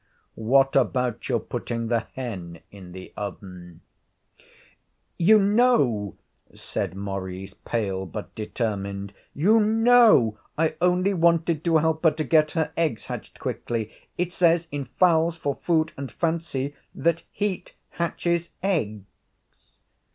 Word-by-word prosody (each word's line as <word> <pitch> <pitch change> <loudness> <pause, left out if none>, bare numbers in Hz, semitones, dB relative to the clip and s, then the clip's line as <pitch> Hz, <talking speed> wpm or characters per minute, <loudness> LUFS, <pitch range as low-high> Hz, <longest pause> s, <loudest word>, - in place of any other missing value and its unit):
What 135 +5 +2
about 125 -3 0
your 120 -3 +2
putting 115 -1 -4
the 115 -1 0
hen 95 -10 -6
in 95 -3 -12
the 95 +1 -10
oven?' 90 -4 -8 1.4
'You 210 +6 +6
know,' 200 - +2 0.4
said 95 - -4
Maurice, 95 -1 -5
pale 95 -4 -3
but 80 - -7
determined, 100 -3 -4 0.2
'you 205 +10 +4
know 220 - +5 0.2
I 160 0 +2
only 180 +2 +3
wanted 170 -2 +2
to 165 -1 +4
help 160 +1 0
her 165 - +7
to 155 +1 -3
get 155 -1 +3
her 160 -3 0
eggs 155 -9 -1
hatched - - -7
quickly. 115 -2 -3 0.3
It 180 0 -1
says 170 -2 +3
in 145 -1 -3
"Fowls 165 +4 +2
for 145 -3 -1
Food 160 -2 +1
and 135 -1 -6
Fancy" 160 -5 -2 0.2
that 170 0 +1
heat 205 -2 -3
hatches 170 0 -1
eggs.' 110 - -1
145 Hz, 125 wpm, -25 LUFS, 105-170 Hz, 1.4 s, her